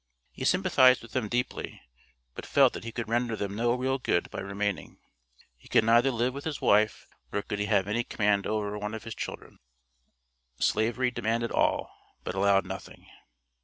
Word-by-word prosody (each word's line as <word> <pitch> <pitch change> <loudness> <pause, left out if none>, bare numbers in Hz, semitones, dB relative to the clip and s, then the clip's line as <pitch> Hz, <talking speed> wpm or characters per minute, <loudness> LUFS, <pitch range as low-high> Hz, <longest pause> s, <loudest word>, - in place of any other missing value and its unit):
He 130 - -6
sympathized 135 -9 +4
with 115 - -12
them 110 -4 -2
deeply, 125 +1 -3 0.5
but - - -8
felt 135 -3 +4
that - - -7
he 115 - -6
could 115 -1 -4
render 115 0 0
them 100 -1 -4
no 120 +2 +1
real 130 +1 -1
good 85 -8 0
by - - -5
remaining; 100 0 -3 0.6
he - - -20
could - - +4
neither 115 +4 +4
live 125 0 0
with 140 +1 -7
his 155 -3 -4
wife 105 +1 +2 0.3
nor 100 - -2
could 105 - -4
he 105 - 0
have 100 -3 +2
any 115 +3 0
command 100 -3 0
over 105 -1 -2
one 105 +1 -4
of 110 - -8
his 115 - -6
children. - - -7 1.0
Slavery 120 - +1
demanded 115 0 -1
all, - - +1 0.3
but - - -4
allowed 100 0 +3
nothing. - - -9
115 Hz, 180 wpm, -28 LUFS, 105-125 Hz, 1.0 s, sympathized